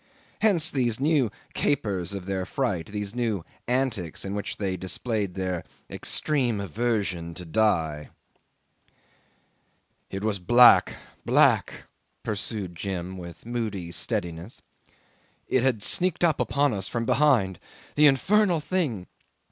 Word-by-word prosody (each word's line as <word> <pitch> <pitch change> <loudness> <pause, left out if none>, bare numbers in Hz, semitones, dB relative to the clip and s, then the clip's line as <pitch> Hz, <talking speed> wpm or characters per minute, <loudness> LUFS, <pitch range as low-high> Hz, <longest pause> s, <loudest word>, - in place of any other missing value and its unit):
Hence 175 -8 +3
these 120 -4 0
new 145 -4 +2 0.2
capers 100 - -1
of 95 -2 -6
their 95 -1 -2
fright, 95 -5 -2
these 105 -1 -5
new 115 -7 -1 0.2
antics 120 - -1
in 95 - -4
which 105 0 -4
they 95 -2 -1
displayed 100 +1 -3
their 90 -2 -2 0.3
extreme 130 -8 0
aversion 100 -4 -2
to 90 - -8
die. 80 -6 +1 2.0
'"It 95 +1 -5
was 105 -2 0
black, 120 +7 +6 0.3
black," - - +3 0.4
pursued 100 -3 -3
Jim 95 0 -4
with 85 0 -10
moody 110 -7 -3
steadiness. 85 +3 -4 0.8
"It 130 - +2
had 120 -5 +1
sneaked 180 -1 +1
upon 145 -4 +2
us 95 -1 -3
from 115 -1 -2
behind. 115 - +3 0.3
The 150 0 +6
infernal 185 +6 +3
thing! 150 - -2
105 Hz, 115 wpm, -26 LUFS, 95-130 Hz, 2.0 s, black